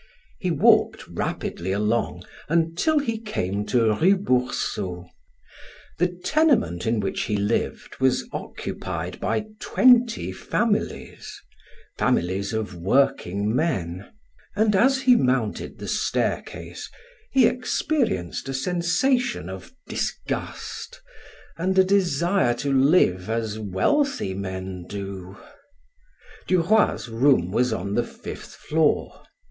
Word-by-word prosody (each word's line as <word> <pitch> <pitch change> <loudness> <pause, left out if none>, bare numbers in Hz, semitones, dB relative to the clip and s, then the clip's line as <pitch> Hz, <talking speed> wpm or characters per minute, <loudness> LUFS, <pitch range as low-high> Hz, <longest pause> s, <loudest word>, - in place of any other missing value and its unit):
He - - -1
walked - - +3
rapidly 90 +2 -3
along 105 +4 0 0.3
until 165 - +2
he 230 -6 0
came 105 - -3
to 115 -4 +3
Rue 185 - +4
Boursault. 105 - -1 0.9
The 180 - +4
tenement 180 - +1
in 115 0 +1
which 100 -2 -2
he 105 - -1
lived 105 +3 -2
was 130 -1 +2
occupied 90 0 -5
by 215 - -1
twenty 245 -2 +4
families 215 -2 -2 0.6
families 95 +3 +1
of 110 -3 -3
workingmen 100 - 0 0.5
and 210 0 +3
as 265 +6 +4
he 250 -1 +6
mounted 125 - 0
the - - -7
staircase - - -2 0.4
he 265 -3 +5
experienced 245 - -1
a 135 - -2
sensation 180 - 0
of 95 0 -9 0.2
disgust - - -4 0.6
and 190 +2 0
a 190 - +8
desire 175 -7 +2
to 140 +3 -2
live 130 - +3
as 110 -1 -2
wealthy 110 - 0
men 95 -1 -5
do. 95 -1 -7 1.1
Duroy's 185 -2 +2
room 115 -6 +2
was 125 +4 +1
on 100 -2 -3
the 120 - +2
fifth - - -9
floor. 155 -1 0
125 Hz, 105 wpm, -24 LUFS, -, 1.1 s, a